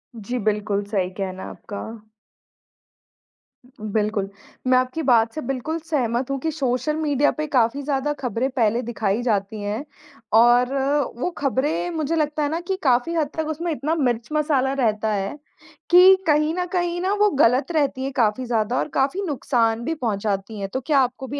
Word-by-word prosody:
जी, 230 +3 -4
बिल्कुल 205 -1 0
सही 200 -3 -1
कहना 190 -1 -4
है - - -6
आपका। 205 -2 -8 2.0
बिल्कुल, 210 -1 -1 0.4
मैं 255 0 +5
आपकी 255 +5 -1
बात 230 -4 +3
से 310 - -4
बिल्कुल 270 +5 -2
सहमत 255 -5 -1
हूँ 275 - 0
कि 320 +4 -2
सोशल 280 0 -1
मीडिया 290 -2 +2
पे 305 - -1
काफ़ी 245 +3 +2
ज़्यादा 285 +1 -1
खबरें 250 +1 -1
पहले 235 -2 +1
दिखाई 220 -2 -1
जाती 210 -3 -1
हैं 205 +5 -3 0.6
और 245 +2 +4 0.4
वो 255 - -1
खबरें 285 +5 0
मुझे 315 0 -1
लगता 300 -1 0
है 290 - 0
ना 325 - -2
कि 385 - +1
काफ़ी 255 +4 +2
हद 310 -3 0
तक 315 -1 -1
उसमें 340 +2 -3
इतना 305 +1 -1
मिर्च-मसाला 270 +1 0
रहता 220 -5 0
है, 195 +7 -3 0.5
कि 365 +2 +8
कहीं 305 +1 +3
न 360 0 -1
कहीं 350 -1 0
ना 380 +2 +1
वो 420 0 +5
गलत 255 +8 +3
रहती 285 -5 0
हैं 270 - -2
काफ़ी 235 0 +1
ज़्यादा 235 0 0
और - - -1
काफ़ी 275 +8 +1
नुकसान 235 -5 0
भी 325 - -1
पहुँचाती 210 -4 -2
हैं। 195 -1 -4
तो 260 - -1
क्या 280 +2 +2
आपको 260 +1 -1
भी 285 +2 -4
255 Hz, 175 wpm, -22 LUFS, 225-300 Hz, 2.0 s, कि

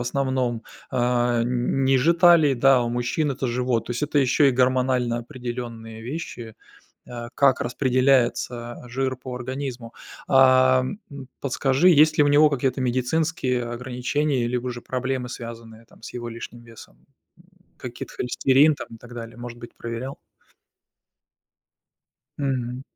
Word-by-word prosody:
основном, 125 -2 -1 0.3
а, 120 -1 +1
н 125 +2 0
ниже 135 +5 +3
талии, 170 -5 +5
да, 130 0 +4
у 120 - -2
мужчин- 120 +5 -1
это 135 0 -3
живот. 125 -1 -1
То - - -7
есть, 120 - -3
это 145 0 0
ещё 135 +2 +3
и 135 - +5
гормонально 125 -1 +1
определённые 120 -3 -7
вещи, 120 -4 -7 0.5
а, 120 -1 -7
как 135 -2 +3
распределяется 125 -2 +1
жир 130 +2 -2
по 125 0 -8
организму. 125 -1 -6 0.4
Ам, 130 +5 +4
м, 140 -2 -9
подскажи, 135 +4 +2
есть 155 -2 +5
ли - - +7
у - - +3
него 150 +2 +6
какие-то 135 -1 -1
медицинские 130 +1 0
ограничения, 125 +3 -2
либо 125 +1 -2
же 120 -1 -7
проблемы, 130 0 -3
связанные 115 -2 -9
там, - - -22
с - - -9
его 120 -1 -6
лишним 115 +1 -9
весом. 115 -2 -16 0.7
Каких-то 125 -1 -8
холестерин 135 +4 +3
там, - - -7
и - - -12
так 120 +1 -13
далее? 115 -1 -8
Может 120 0 -8
быть 120 0 -11
проверял? 115 +4 -5 2.2
Мгм. 130 -3 -2
125 Hz, 140 wpm, -23 LUFS, 120-135 Hz, 2.2 s, ли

